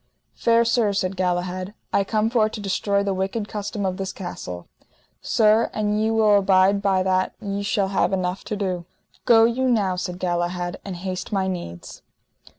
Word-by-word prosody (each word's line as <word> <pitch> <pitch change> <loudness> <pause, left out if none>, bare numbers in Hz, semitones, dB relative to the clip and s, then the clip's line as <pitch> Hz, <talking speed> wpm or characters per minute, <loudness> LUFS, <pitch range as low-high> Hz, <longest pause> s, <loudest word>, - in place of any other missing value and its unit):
Fair 230 0 +3
sir, 230 -3 +2
said 195 -1 -1
Galahad, 185 +2 -2 0.2
I 200 - +3
come 215 +2 0
for 220 -3 +3
to 220 - -7
destroy 200 0 0
the 200 -1 0
wicked 195 +3 -2
custom 205 -1 -4
of 185 -1 -1
this 190 -1 -3
castle. 90 - -7 0.5
Sir, 220 0 +3
an 210 0 0
ye 220 +1 +1
will 215 -2 +4
abide 195 +1 +3
by 190 -2 +2
that 185 0 0
ye 200 -2 -3
shall 200 -1 0
have 195 -1 +1
enough 185 0 -2
to 210 - -3
do. 185 -4 -3 0.4
Go 225 -1 +6
you 255 +3 +1
now, 200 -6 +2
said 180 0 -4
Galahad, 175 0 -2
and 195 -2 -6
haste 185 +1 -5
my 195 -2 0
needs. 170 - -6
195 Hz, 175 wpm, -23 LUFS, 185-215 Hz, 0.5 s, Go